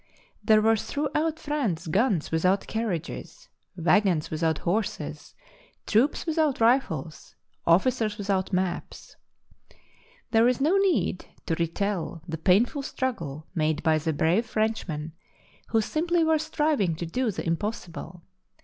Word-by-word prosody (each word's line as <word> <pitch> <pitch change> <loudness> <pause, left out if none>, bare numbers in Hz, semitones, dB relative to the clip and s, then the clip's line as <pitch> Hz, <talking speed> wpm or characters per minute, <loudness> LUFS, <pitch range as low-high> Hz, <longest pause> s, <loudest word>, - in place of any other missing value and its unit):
There 215 -1 +5
were 225 0 +4
throughout' 300 +6 -1
France 265 - -2
guns 190 - +1
without 185 +5 +2
carriages, 220 - -4 0.3
waggons 175 -1 +2
without 160 0 0
horses, 200 +6 -3 0.5
troops 255 +11 +2
without 315 -4 +1
rifles, 225 - 0 0.3
officers 210 +4 +2
without 195 -2 -1
maps. 185 -1 -3 1.2
There 225 0 +5
is 250 0 +1
no 310 +7 +3
need 375 - +1 0.2
to - - -1
retell 170 0 -2
the 160 -2 -4
painful 220 - +3
struggle 170 - -4
made 155 -1 0
by 160 -1 +3
the 160 +1 -1
brave 170 +9 +1
Frenchmen, 215 -9 -2 0.6
who 225 - +2
simply 335 +8 +1
were 320 -1 +3
striving 295 - 0
to 170 - -4
do 245 +9 -1
the 195 - -4
impossible. 170 -1 -4
205 Hz, 120 wpm, -26 LUFS, 165-260 Hz, 1.2 s, There